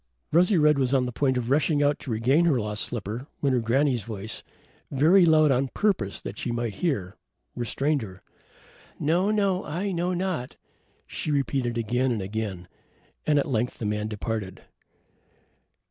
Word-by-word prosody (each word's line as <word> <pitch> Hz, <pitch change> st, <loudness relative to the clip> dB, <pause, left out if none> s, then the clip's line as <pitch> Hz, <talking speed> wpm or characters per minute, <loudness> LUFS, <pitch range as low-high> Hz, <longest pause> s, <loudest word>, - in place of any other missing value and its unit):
Rosy 180 Hz, +4 st, +4 dB
red 150 Hz, -2 st, +4 dB
was 130 Hz, 0 st, +2 dB
on 130 Hz, -1 st, +2 dB
the 125 Hz, -, -3 dB
point 130 Hz, +1 st, +1 dB
of 125 Hz, 0 st, -2 dB
rushing 145 Hz, 0 st, +3 dB
out 145 Hz, 0 st, +2 dB
to -, -, -8 dB
regain 125 Hz, +9 st, +2 dB
her 145 Hz, -7 st, +3 dB
lost 105 Hz, -1 st, -2 dB
slipper 115 Hz, +3 st, -5 dB
when 140 Hz, -2 st, +1 dB
her 125 Hz, -, +3 dB
granny's 125 Hz, +2 st, +1 dB
voice 110 Hz, 0 st, -5 dB, 0.5 s
very 170 Hz, +7 st, +5 dB
loud 155 Hz, -2 st, +5 dB
on 135 Hz, +1 st, +2 dB
purpose 130 Hz, -, -1 dB
that 100 Hz, -, -6 dB
she -, -, -3 dB
should 120 Hz, -2 st, -2 dB
hear 100 Hz, -, -2 dB, 0.4 s
restrained 135 Hz, +4 st, 0 dB
her. 95 Hz, -4 st, -9 dB, 0.8 s
"No, 175 Hz, +7 st, +2 dB
no, 200 Hz, -3 st, +1 dB
I 180 Hz, +6 st, -3 dB
know 175 Hz, +1 st, -1 dB
not," 180 Hz, -8 st, -3 dB, 0.5 s
she -, -, -5 dB
repeated 135 Hz, -4 st, 0 dB
again 125 Hz, +3 st, 0 dB
and 115 Hz, -, -1 dB
again, 100 Hz, -3 st, -4 dB, 0.6 s
and 150 Hz, -1 st, +4 dB
at 140 Hz, -, +2 dB
length 125 Hz, -3 st, -1 dB
the 115 Hz, -, -5 dB
man 105 Hz, 0 st, -1 dB
departed. 105 Hz, -2 st, -4 dB
130 Hz, 165 wpm, -26 LUFS, 110-155 Hz, 0.8 s, very